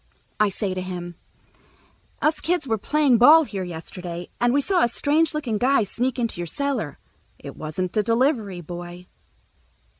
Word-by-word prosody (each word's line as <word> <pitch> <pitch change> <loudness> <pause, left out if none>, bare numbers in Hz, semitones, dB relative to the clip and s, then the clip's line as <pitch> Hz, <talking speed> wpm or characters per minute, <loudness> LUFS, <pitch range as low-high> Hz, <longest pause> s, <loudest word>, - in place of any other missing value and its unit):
I 210 -1 +4
say 195 0 -2
to 185 - -3
him, 180 -1 -6 1.1
"Us 305 0 +2
kids 345 -4 0
were 220 -2 0
playing 285 0 +3
ball 310 +7 +8
here 200 -9 -5
yesterday, 175 0 -7
and 240 0 +3
we 280 - +3
saw 360 +5 +1
a - - +4
strange 300 +6 +1
looking 240 -9 -2
guy 255 -1 +3
sneak 250 +5 -2
into 230 -7 -2
your 170 - -4
cellar. 255 - -2 0.4
It - - -10
wasn't 175 +4 -4
a 215 - +4
delivery 230 - 0
boy." 175 +1 -8
220 Hz, 160 wpm, -23 LUFS, 180-280 Hz, 1.1 s, ball